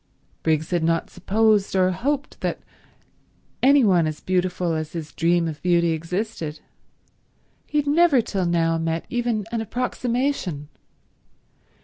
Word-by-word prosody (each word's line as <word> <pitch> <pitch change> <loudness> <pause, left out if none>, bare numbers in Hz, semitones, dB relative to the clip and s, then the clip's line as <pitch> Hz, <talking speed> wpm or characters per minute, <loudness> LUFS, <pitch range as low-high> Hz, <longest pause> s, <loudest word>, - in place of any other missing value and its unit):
Briggs 160 +1 0
had 175 -2 +1
not 165 0 0
supposed 205 +2 +1
or 185 -1 +3
hoped 275 +10 -3
that - - -2 1.0
any 275 +1 +6
one 180 -6 +4
as 155 -1 -4
beautiful 180 -2 0
as 155 -1 -4
his 160 -3 -6
dream 170 0 +2
of 150 -2 -6
beauty 170 -1 +2
existed. 165 -1 -3 1.1
He 300 - -2
had 295 - +2
never 310 -2 +4
till 195 -5 -1
now 165 -1 +1
met 165 0 -2
even 240 -4 -1
an 230 -1 -1
approximation. 240 - -2
180 Hz, 130 wpm, -23 LUFS, 165-230 Hz, 1.1 s, any